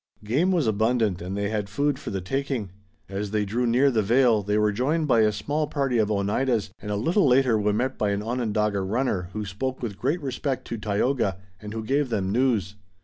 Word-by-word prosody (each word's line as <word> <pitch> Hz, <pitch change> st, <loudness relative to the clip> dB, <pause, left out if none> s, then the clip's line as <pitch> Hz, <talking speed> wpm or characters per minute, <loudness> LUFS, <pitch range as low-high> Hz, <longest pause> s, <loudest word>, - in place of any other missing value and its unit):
Game 140 Hz, -, +1 dB
was 170 Hz, -6 st, +2 dB
abundant 110 Hz, -3 st, +1 dB
and 95 Hz, +3 st, -4 dB
they 100 Hz, 0 st, -1 dB
had 105 Hz, -2 st, -2 dB
food 140 Hz, +5 st, 0 dB
for -, -, -6 dB
the 95 Hz, -2 st, -3 dB
taking. 130 Hz, -1 st, -2 dB, 0.4 s
As 100 Hz, +1 st, -4 dB
they 105 Hz, 0 st, 0 dB
drew 120 Hz, +5 st, -1 dB
near 130 Hz, +4 st, +4 dB
the 110 Hz, -3 st, +2 dB
vale 115 Hz, +1 st, +3 dB
they 105 Hz, +1 st, 0 dB
were 105 Hz, 0 st, +3 dB
joined 150 Hz, +9 st, 0 dB
by 120 Hz, -4 st, +4 dB
a 110 Hz, -1 st, +4 dB
small 145 Hz, +9 st, -2 dB
party 135 Hz, -5 st, 0 dB
of 105 Hz, -1 st, +2 dB
Oneidas, 105 Hz, +1 st, 0 dB
and 105 Hz, -, -7 dB
a 105 Hz, -, 0 dB
little 165 Hz, -, +2 dB
later 125 Hz, -3 st, +4 dB
were 105 Hz, 0 st, +1 dB
met 125 Hz, +5 st, -1 dB
by 105 Hz, -, +1 dB
an 100 Hz, +1 st, -1 dB
Onondaga 105 Hz, -4 st, 0 dB
runner 95 Hz, -3 st, -1 dB
who 105 Hz, 0 st, -3 dB
spoke 130 Hz, +7 st, -4 dB
with 105 Hz, -5 st, -4 dB
great 145 Hz, +8 st, 0 dB
respect 135 Hz, -2 st, -3 dB
to 115 Hz, -, -3 dB
Tayoga 105 Hz, 0 st, 0 dB, 0.2 s
and 105 Hz, 0 st, -7 dB
who 110 Hz, -, -3 dB
gave 135 Hz, +3 st, 0 dB
them 100 Hz, -4 st, -1 dB
news. 110 Hz, -5 st, +1 dB
110 Hz, 215 wpm, -25 LUFS, 105-130 Hz, 0.4 s, near